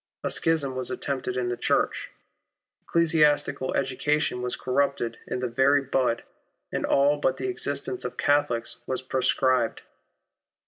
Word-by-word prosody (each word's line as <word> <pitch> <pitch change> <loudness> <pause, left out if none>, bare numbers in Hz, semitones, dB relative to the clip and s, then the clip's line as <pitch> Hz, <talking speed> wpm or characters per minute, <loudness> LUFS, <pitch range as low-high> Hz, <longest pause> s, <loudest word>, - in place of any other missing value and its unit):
A - - -1
schism 150 -5 +1
was 130 -1 -3
attempted 130 -2 -3
in 125 -1 0
the 120 - -1
Church. - - 0 0.7
Ecclesiastical 155 -5 +2
education 140 -1 0
was 125 0 -1
corrupted 130 -3 -1
in - - -2
the 125 0 -2
very 135 +4 +3
bud, 130 -3 0 0.5
and - - -1
all 140 +1 +3
but 175 +4 +1
the - - -3
existence 375 0 -3
of - - -5
Catholics 145 -5 +1
was 130 0 -2
proscribed. 130 -2 +1
135 Hz, 135 wpm, -26 LUFS, 125-145 Hz, 0.7 s, very